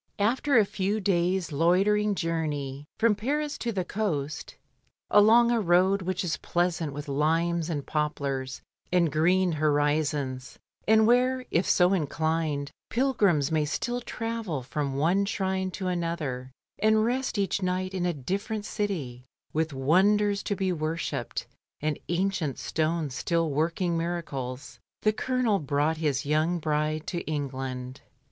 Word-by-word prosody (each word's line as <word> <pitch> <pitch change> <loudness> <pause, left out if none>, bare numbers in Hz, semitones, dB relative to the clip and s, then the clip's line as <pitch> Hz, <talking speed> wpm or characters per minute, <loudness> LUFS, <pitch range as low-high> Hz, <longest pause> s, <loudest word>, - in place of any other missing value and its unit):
Aftfr 245 +5 +3
a 210 - +4
few 200 +2 -1
days' 180 -3 +1
loitering 195 +7 +3
journey, 150 -5 -3
from 230 -1 +4
Paris 290 +8 -2
to 235 - -2
the 190 -4 -2
coast, 155 -10 -3 0.6
along 225 +3 +6
a 235 -2 +2
road 185 +2 +3
which 185 +1 -2
is 170 -3 -1
pleasant 175 -3 -1
with 145 +2 -7
limes 165 +4 +1
and 145 -4 -3
poplars, 140 -4 -2 0.3
and 175 -3 +3
green 180 +4 +3
horizons, 145 -3 0 0.3
and 220 0 +6
where 250 +2 +3
(if 170 - +1
so 180 +1 +4
inclined) 155 -3 -1 0.2
pilgrims 205 - +2
may 155 -1 +2
still 240 +11 -2
travel 225 - -4
from 135 +2 -3
one 170 +8 +2
shrine 190 -2 -1
to 185 +1 -6
another, 165 -8 -2 0.3
and 215 0 +4
rest 255 0 -1
each 200 0 0
night 185 +1 -1
in 180 -2 0
a - - +2
different 200 - -3
city, 160 - -3 0.3
with 160 0 0
wonders 200 +9 +3
to 205 - -2
be 190 -1 0
worshipped, 160 +1 -3 0.3
and 150 -1 -1
ancient 175 -5 0
stones 155 -3 -1
still 165 +3 0
working 165 +4 0
miracles, 150 -6 -4 0.2
the 215 - +3
Colonel 240 -3 +1
brought 145 +2 0
his 145 -4 0
young 155 +4 +1
bride 155 0 -1
to 175 - -3
England. 130 -3 -4
170 Hz, 140 wpm, -27 LUFS, 150-200 Hz, 0.6 s, along